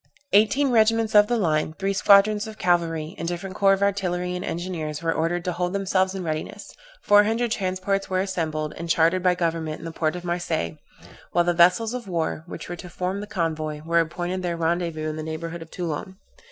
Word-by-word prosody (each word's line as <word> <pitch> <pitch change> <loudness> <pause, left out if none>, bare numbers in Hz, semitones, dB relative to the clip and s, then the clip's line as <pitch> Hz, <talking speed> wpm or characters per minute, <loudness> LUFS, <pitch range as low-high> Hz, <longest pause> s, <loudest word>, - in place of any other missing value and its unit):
Eighteen 260 +7 +4
regiments 225 -1 +3
of 210 0 +7
the 240 - +1
line, 155 -5 0
three 195 0 -1
squadrons 205 +2 +5
of 215 -1 -9
cavalry, 165 -3 0
and 165 - -3
different 175 +2 -4
corps 195 -1 +4
of 195 +1 0
artillery 180 -3 -1
and 180 - -4
engineers 165 -3 -4
were 165 0 +1
ordered 170 +2 -1
to 180 - 0
hold 180 +1 -2
themselves 190 -1 +1
in 190 - -4
readiness; 155 -2 -5 0.3
four 205 0 +6
hundred 225 +2 0
transports 195 0 -1
were 185 -1 0
assembled, 160 -5 -2
and 170 +1 -6
chartered 165 +3 +3
by 180 0 +3
government 165 -3 -2
in - - -11
the 165 - -5
port 160 0 -1
of 180 - -6
Marseilles, 170 - -2 0.6
while 175 - +4
the 175 0 +1
vessels 180 +7 +4
of 245 -4 -5
war, 165 -3 -2
which - - -8
were 175 - -5
to 180 - -9
form 180 +3 -3
the 210 - -7
convoy, 155 -4 -3
were 170 +1 +3
appointed 175 +3 -2
their 175 -2 -2
rendezvous 165 -1 -1
in 155 0 -4
the - - -4
neighborhood 165 +2 -5
of 165 - -10
Toulon. 180 +3 -5
175 Hz, 205 wpm, -24 LUFS, 165-195 Hz, 0.6 s, of